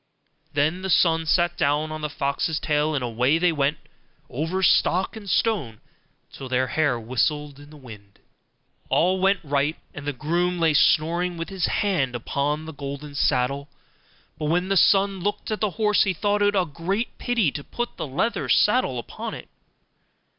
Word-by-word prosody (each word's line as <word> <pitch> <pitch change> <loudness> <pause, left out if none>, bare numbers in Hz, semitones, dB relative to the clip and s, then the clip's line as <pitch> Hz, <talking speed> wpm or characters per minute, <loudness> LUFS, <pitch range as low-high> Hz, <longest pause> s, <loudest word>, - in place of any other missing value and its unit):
Then 155 +6 +1
the 190 - -4
son 165 -2 +3
sat 175 +1 +2
down 150 +2 +1
on 155 0 -5
the 150 - -2
fox's 145 +2 -1
tail, 150 0 0
and 135 - -1
away 125 +5 +1
they 175 +1 +2
went 145 0 0 0.5
over 165 +8 -2
stock 185 +2 +3
and 205 -3 -8
stone 170 - 0 0.5
till 130 - -8
their 130 0 0
hair 145 -6 +1
whistled 140 +5 -1
in 145 0 -14
the 155 - -14
wind. 105 -7 -13 0.7
All 185 +3 +2
went 195 +1 +2
right, 145 +1 0 0.2
and 145 0 -8
the - - +1
groom 175 +6 -1
lay 165 -2 +3
snoring 170 +4 +2
with 165 - -5
his 190 -3 -1
hand 155 -12 0
upon 145 +5 -2
the 160 - -8
golden 140 +1 -7
saddle. 140 +1 0 0.7
But 155 - -3
when 175 +5 0
the 195 - +2
son 195 0 +4
looked 205 +4 -3
at 215 - -2
the 210 - +2
horse, 210 -2 +3
he 195 - +2
thought 205 +4 0
it 205 0 +3
a 185 -2 +2
great 180 +9 -3
pity 230 - +1
to 145 - -6
put 240 +9 -5
the - - -4
leathern 175 - -1
saddle 210 - +3
upon 120 - -6
it. - - -11
155 Hz, 175 wpm, -24 LUFS, 140-185 Hz, 0.7 s, son